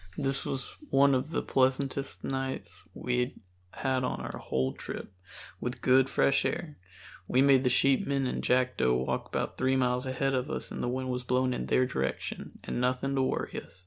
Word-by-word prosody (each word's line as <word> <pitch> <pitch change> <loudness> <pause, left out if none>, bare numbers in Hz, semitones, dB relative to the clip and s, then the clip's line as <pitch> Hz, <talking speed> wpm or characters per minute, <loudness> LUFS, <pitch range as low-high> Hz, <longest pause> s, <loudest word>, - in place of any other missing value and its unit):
This 135 0 -1
was 135 -1 -4
one 140 0 +5
of 130 +3 0
the - - -1
pleasantest 135 +1 0
nights 130 -11 -4
we 125 0 -1 0.3
had 130 +4 -1
on 125 - -1
our - - -5
whole 65 0 -1
trip, - - -7 0.5
with 125 +1 -3
good 130 +1 +5
fresh 140 - +3
air 155 -4 -3 0.5
(we 125 - +2
made 135 -1 +6
the 125 - +3
sheepmen 135 +1 +2
and 125 - -2
Jackdo 125 - +2
walk - - -2
about - - -3
three 130 +1 +2
miles 125 0 +1
ahead 135 +1 0
of 130 -1 0
us - - -4
and - - -4
the 120 - 0
wind 130 +1 -2
was 125 0 -2
blowing 125 +1 +1
in - - -3
their 130 - +3
direction) 65 - -3
and - - -3
nothing 130 +2 0
to 135 - +2
worry 130 - -1
us. - - -18
130 Hz, 185 wpm, -30 LUFS, 125-135 Hz, 0.5 s, made